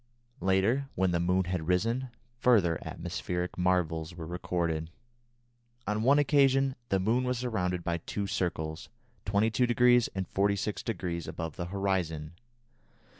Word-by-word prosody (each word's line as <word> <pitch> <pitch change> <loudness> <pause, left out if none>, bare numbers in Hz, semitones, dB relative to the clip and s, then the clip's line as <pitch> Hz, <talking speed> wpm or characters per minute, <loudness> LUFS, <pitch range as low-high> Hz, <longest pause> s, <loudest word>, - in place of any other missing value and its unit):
Later, 95 +9 +2
when 95 0 +2
the 85 - +1
moon 90 +2 +2
had 90 -3 -3
risen, 115 +8 +1 0.3
further 100 -11 +4
atmospheric 90 +1 -4
marvels 85 -3 0
were 85 -2 -6
recorded. 85 -2 -2 1.0
On 105 +1 -1
one 135 +5 +5
occasion 135 -2 +3
the 95 - +2
moon 115 +7 +1
was 125 -1 0
surrounded 90 -8 -1
by 85 0 -1
two 100 +5 -4
circles, 80 -5 -3 0.4
22° 120 +3 +3
and 95 -1 -2
46° 100 -3 -1
above 80 -3 -5
the 85 - -4
horizon. 90 -5 -2
95 Hz, 125 wpm, -30 LUFS, 85-115 Hz, 1.0 s, one